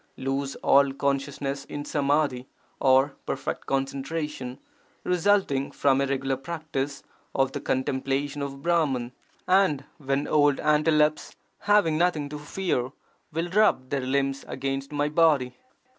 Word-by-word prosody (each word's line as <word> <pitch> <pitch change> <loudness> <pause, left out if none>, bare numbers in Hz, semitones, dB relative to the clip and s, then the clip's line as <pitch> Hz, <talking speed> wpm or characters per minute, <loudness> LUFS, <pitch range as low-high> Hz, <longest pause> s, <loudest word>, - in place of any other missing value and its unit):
lose 135 +1 -2
all 140 0 +5
consciousness 140 0 -2
in 145 0 -6
samadhi 140 -3 0 0.3
or 135 +1 +4 0.2
perfect - - -4
concen 135 0 -1
tration) 150 -4 -4 0.5
resulting 180 -6 +2
from 135 -1 +2
a 140 - +1
regular 135 0 -1
practice 140 -1 -4 0.3
of 135 -1 +2
the - - -5
contem 130 0 -1
plation 140 +2 -1
of 140 0 -5
Brahman, 145 -8 +1 0.4
and 185 -7 +3 0.2
when 140 0 -1
old 145 -2 +3
antelopes 150 0 +2 0.2
having 200 -7 +3
nothing 160 -5 +1
to 150 0 -6
fear, 145 -5 -2 0.4
will 165 +3 -2
rub 190 -11 +3
their 140 -1 0
limbs 135 +1 -1
against 135 +1 -3
my 145 0 0
body! 150 -5 +3
140 Hz, 130 wpm, -26 LUFS, 135-155 Hz, 0.5 s, all